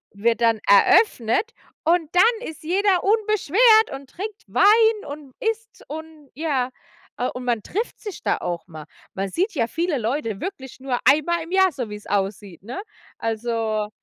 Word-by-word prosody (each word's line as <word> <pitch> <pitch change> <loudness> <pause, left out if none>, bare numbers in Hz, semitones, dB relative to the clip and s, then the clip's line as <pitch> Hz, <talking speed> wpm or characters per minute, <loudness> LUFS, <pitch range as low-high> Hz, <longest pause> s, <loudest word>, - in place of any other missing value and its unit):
wird 230 +3 +1
dann 230 -2 +3
eröffnet 240 - +4 0.3
und 330 -2 +2
dann 455 +5 +3
ist 315 - -9
jeder 375 +3 +2
unbeschwert 435 +1 +4
und 270 -1 -9
trinkt 410 +3 -7
Wein 440 +1 +4
und 285 -2 -9
isst 450 0 -4
und 315 -1 -9
ja. 275 -4 -1 0.5
Ah, 250 - 0
und 250 - -7
man 235 -3 0
trifft 435 - -4
sich 415 -4 -8
da - - +1
auch 170 -2 -4
mal. 155 -3 -10 0.3
Man 195 0 -3
sieht 375 - -1
ja 235 -7 0
viele 330 +3 -1
Leute 230 -3 -2
wirklich 265 -11 -7
nur 260 -2 -2
einmal 320 +3 +3
im 330 - -11
Jahr, 380 -1 +4
so 250 -6 -5
wie's 210 0 -9
aussieht, 195 -2 -3
ne? 250 - -6 0.4
Also 225 -2 -2
295 Hz, 165 wpm, -23 LUFS, -, 0.5 s, eröffnet